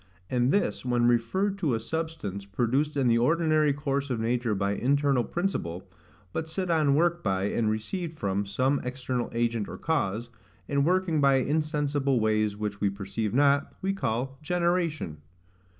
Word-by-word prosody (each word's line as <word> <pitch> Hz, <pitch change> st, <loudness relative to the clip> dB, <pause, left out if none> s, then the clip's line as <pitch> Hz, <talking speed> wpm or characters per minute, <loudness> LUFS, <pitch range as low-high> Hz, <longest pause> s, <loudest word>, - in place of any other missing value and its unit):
And 125 Hz, +1 st, +2 dB
this, 205 Hz, -, 0 dB
when 120 Hz, -1 st, +1 dB
referred 190 Hz, -, +1 dB
to 150 Hz, -10 st, +1 dB
a -, -, -1 dB
substance, 135 Hz, -, -4 dB
produced 130 Hz, +8 st, 0 dB
in 135 Hz, -3 st, +2 dB
the 115 Hz, 0 st, +4 dB
ordinary 155 Hz, +2 st, +3 dB
course 140 Hz, -1 st, -2 dB
of 125 Hz, -3 st, -1 dB
nature 120 Hz, -1 st, 0 dB
by 100 Hz, +1 st, 0 dB
internal 135 Hz, +3 st, +2 dB
principle, 100 Hz, -, -3 dB, 0.5 s
but 160 Hz, 0 st, -3 dB
set 185 Hz, +2 st, -2 dB
on 150 Hz, -4 st, +3 dB
work 170 Hz, +2 st, +2 dB
by, 95 Hz, -1 st, 0 dB
and 110 Hz, +2 st, 0 dB
received 160 Hz, -, -3 dB
from, 100 Hz, -2 st, -1 dB
some 130 Hz, +7 st, +1 dB
external 125 Hz, -1 st, -3 dB
agent, 115 Hz, -2 st, -1 dB
or -, -, -7 dB
cause, 120 Hz, -7 st, -1 dB, 0.4 s
and 140 Hz, -1 st, +1 dB
working 180 Hz, -4 st, +2 dB
by 140 Hz, -1 st, +5 dB
insensible 145 Hz, -1 st, +1 dB
ways 110 Hz, -1 st, +1 dB
which 105 Hz, -1 st, -4 dB
we 100 Hz, -, +3 dB
perceive 100 Hz, +2 st, -3 dB
not, 140 Hz, +1 st, +3 dB
we 195 Hz, 0 st, +1 dB
call 135 Hz, -, -2 dB
GENERATION. 170 Hz, -, 0 dB
135 Hz, 160 wpm, -27 LUFS, 110-155 Hz, 0.5 s, by